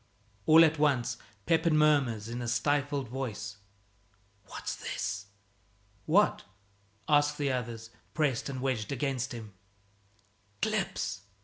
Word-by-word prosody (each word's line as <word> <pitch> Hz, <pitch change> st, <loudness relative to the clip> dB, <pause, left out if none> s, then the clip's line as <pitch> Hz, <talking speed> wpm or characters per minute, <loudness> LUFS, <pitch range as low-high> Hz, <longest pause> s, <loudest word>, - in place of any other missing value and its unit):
All 160 Hz, +1 st, +9 dB
at 160 Hz, -1 st, 0 dB
once 140 Hz, -5 st, +2 dB, 0.3 s
Pepin 165 Hz, -1 st, +3 dB
murmurs 135 Hz, -8 st, +3 dB
in 120 Hz, +1 st, -4 dB
a 120 Hz, -, -3 dB
stifled 145 Hz, +2 st, 0 dB
voice, 110 Hz, -5 st, -5 dB, 0.9 s
"What's -, -, -5 dB
this?" 100 Hz, 0 st, -4 dB, 0.8 s
"What?" 200 Hz, +7 st, +3 dB, 0.6 s
ask 145 Hz, 0 st, +3 dB
the 145 Hz, -2 st, 0 dB
others, 115 Hz, -2 st, -4 dB, 0.2 s
pressed 145 Hz, -5 st, 0 dB
and 130 Hz, -2 st, -4 dB
wedged 125 Hz, -6 st, -1 dB
against 135 Hz, -1 st, -1 dB
him. 110 Hz, -4 st, -8 dB, 1.1 s
"Clips!" 95 Hz, 0 st, -1 dB
135 Hz, 110 wpm, -30 LUFS, 115-150 Hz, 1.1 s, All